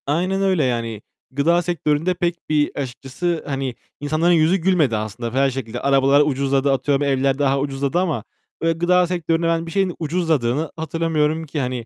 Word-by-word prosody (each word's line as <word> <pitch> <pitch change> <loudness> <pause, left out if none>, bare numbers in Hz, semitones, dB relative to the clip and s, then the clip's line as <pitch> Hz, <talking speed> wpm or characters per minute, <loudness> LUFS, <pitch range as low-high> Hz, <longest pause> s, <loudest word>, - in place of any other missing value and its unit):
Aynen 180 +6 0
öyle 190 -5 +2
yani. 115 -4 -2 0.3
Gıda 165 +6 +2
sektöründe 165 0 0
pek 175 -1 -1
bir, 150 -1 +2
açıkçası, 140 +5 -3
hani, 135 -3 -3 0.2
insanların 155 +4 +1
yüzü 165 +2 +4
gülmedi 165 - +2
aslında 110 +2 -5
her 135 0 +4
şekilde. 120 -2 -5
Arabalar 135 +1 +4
ucuzladı, 140 -1 +1
atıyorum, 140 +1 +1
evler 135 -1 +1
daha 140 -1 +2
ucuzladı 140 +3 -1
ama 160 - -1 0.4
böyle 165 0 +1
gıda 180 +1 +3
sektöründe 170 -1 0
ben 165 0 0
bir 165 - -8
şeyin 190 -1 0
ucuzladığını 155 -4 0
hatırlamıyorum 160 -1 -1
ki. 150 0 -4
Hani, 125 -3 -3
150 Hz, 160 wpm, -21 LUFS, 135-170 Hz, 0.4 s, yüzü